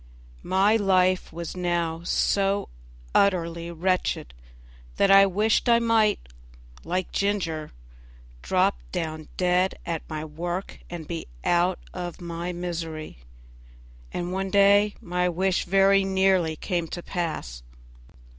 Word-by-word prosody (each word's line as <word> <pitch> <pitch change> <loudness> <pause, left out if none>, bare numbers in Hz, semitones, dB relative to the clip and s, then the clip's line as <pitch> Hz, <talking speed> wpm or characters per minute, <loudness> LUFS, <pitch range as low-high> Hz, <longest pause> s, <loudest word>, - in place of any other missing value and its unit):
My 200 +4 +3
life 185 -3 +2
was 170 +1 -6
now 170 -2 -1
so 195 +3 +1 0.4
utterly 170 -3 +1
wretched 170 - -1 0.6
that 195 - +4
I 195 0 +8
wished 215 +5 +1
I 235 - +6
might, 225 -3 +3 0.7
like 180 +2 -2
Ginger, 175 -7 -1 0.7
drop - - +1
down 155 - -4
dead 180 +1 +2
at 165 -2 -2
my 155 -1 -4
work 175 +4 -5
and 170 -3 -7
be 170 -1 -5 0.2
out 175 +1 +2 0.2
of 175 -2 -6
my 170 0 -4
misery, 165 - -5 0.9
and 175 +1 -3
one 195 +1 -2
day 200 +1 +4
my 180 +1 0
wish 185 +2 0
very 195 +1 +4
nearly 190 -4 +2
came 170 0 -2
to 175 +2 -6
pass. 155 - -4
180 Hz, 120 wpm, -25 LUFS, 170-195 Hz, 0.9 s, I